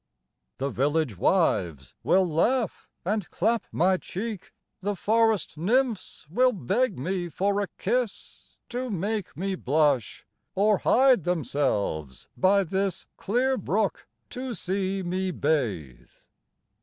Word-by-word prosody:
The 140 +1 -2
village 145 -2 0
wives 75 -5 +1
will 190 -1 +3
laugh 220 +8 0 0.2
and 205 0 -1
clap 225 +4 0
my 185 +2 +3
cheek; 205 +2 -6 0.3
The 205 +2 -1
forest 220 -4 +1
nymphs 230 +2 0
will 250 +10 +3
beg 205 - 0
me 175 +5 -2
for 200 +5 0
a 200 - -2
kiss, 245 -4 -3
To 250 +1 -3
make 205 -3 -3
me 195 +3 -1
blush, 145 - +1 0.3
or 205 +1 +3
hide 255 - +4
themselves 125 - -1
by 195 +1 +4
this 190 +1 -2
Clear 255 +6 +1
brook 200 +2 -1 0.2
to 250 -1 -4
see 190 +1 -2
me 185 +2 -1
bathe. 115 - -2
190 Hz, 120 wpm, -26 LUFS, 155-220 Hz, 0.3 s, hide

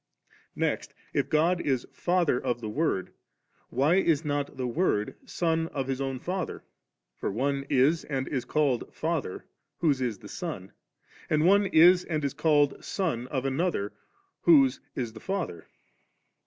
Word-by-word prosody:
Next, - - -2 0.2
if - - 0
God 170 +3 +2
is 130 -4 0
Fatiier 175 -8 +1
of 120 -1 -1
the 110 -2 -5
Word, 105 - -1 0.6
why 145 +8 +3
is 165 -5 +2
not 145 -2 -2
the 130 - -2
Word 120 - 0
Son 165 -1 0
of 135 -4 -3
His 135 0 -2
own 135 -1 -2
Father? 180 +6 -4 0.5
for - - -3
one 140 +5 -1
is 140 +6 +3
and 135 -2 -2
is 130 -4 -2
called 140 -2 0
fieither, 160 - -3 0.3
whose 145 -6 +1
is 120 -5 -1
the - - -12
son; - - -6 0.6
and 155 +1 +2
one 200 +2 +5
is 180 +1 +6
and 155 -3 -2
is 140 - -1
called 145 -3 +2
son 130 - -2
of 130 -1 -2
another, 135 - -1 0.5
whc^eis 135 -6 +3
the 110 - -10
&ther. 180 - -4
145 Hz, 150 wpm, -28 LUFS, 130-165 Hz, 0.6 s, is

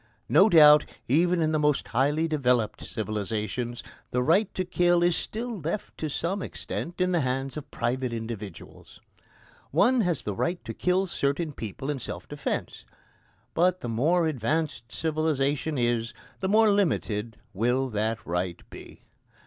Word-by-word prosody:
No 200 +4 +6
doubt, 150 -4 +8 0.2
even 170 +5 +3
in 155 - +1
the 155 - +1
most 150 -1 +1
highly 145 +7 +1
developed 125 -8 +1
civilisations, 110 +2 -3 0.3
the 125 0 0
right 185 +8 +3
to 185 - -1
kill 175 -1 +3
is 175 -1 +3
still 230 +2 -4
left 165 +6 -4
to 155 - -2
some 185 +7 -2
extent 175 -1 -5
in 180 0 +2
the 175 - +2
hands 135 +1 -2
of 150 - -7
private 125 +1 -2
individuals. 110 -5 -8 0.7
One 245 +3 +3
has 170 - 0
the 105 - -3
right 170 - -2
to - - -5
kill 185 +1 +1
certain 150 -2 -1
people 125 +5 -5
in 140 - -4
self - - -7
defence. - - -4 0.7
But 180 +2 +2
the 120 - -4
more 160 +10 +2
advanced 145 -2 -2
civilisation 155 -2 0
is, 120 -1 0 0.2
the 190 - -1
more 215 +1 +5
limited 120 - 0 0.2
will 125 +6 +1
that 110 +1 0
right 90 0 -2
be. - - -12
150 Hz, 150 wpm, -27 LUFS, 120-175 Hz, 0.7 s, doubt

